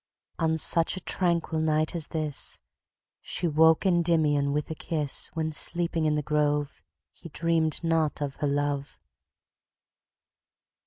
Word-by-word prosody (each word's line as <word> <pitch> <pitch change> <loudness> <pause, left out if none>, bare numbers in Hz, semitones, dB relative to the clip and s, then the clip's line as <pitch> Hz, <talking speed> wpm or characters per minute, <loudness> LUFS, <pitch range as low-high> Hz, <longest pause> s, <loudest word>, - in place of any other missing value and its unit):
On 160 -1 +1
such 165 +3 +4
a - - -6
tranquil 170 -3 0
night 155 0 0
as 165 -3 -3
this, 155 -3 -3 0.6
She 175 - -3
woke 160 +3 +3
Endymion 160 -5 +2
with 150 +2 -3
a - - -1
kiss, 150 -2 0
When, 160 -1 -2
sleeping 170 +1 0
in 150 - +1
the 150 - -2
grove, 150 - -1 0.3
He 170 - -13
dreamed 165 0 0
not 165 -2 0
of 145 -2 -4
her 145 - -1
love. 145 0 -2
155 Hz, 135 wpm, -26 LUFS, 150-165 Hz, 0.6 s, such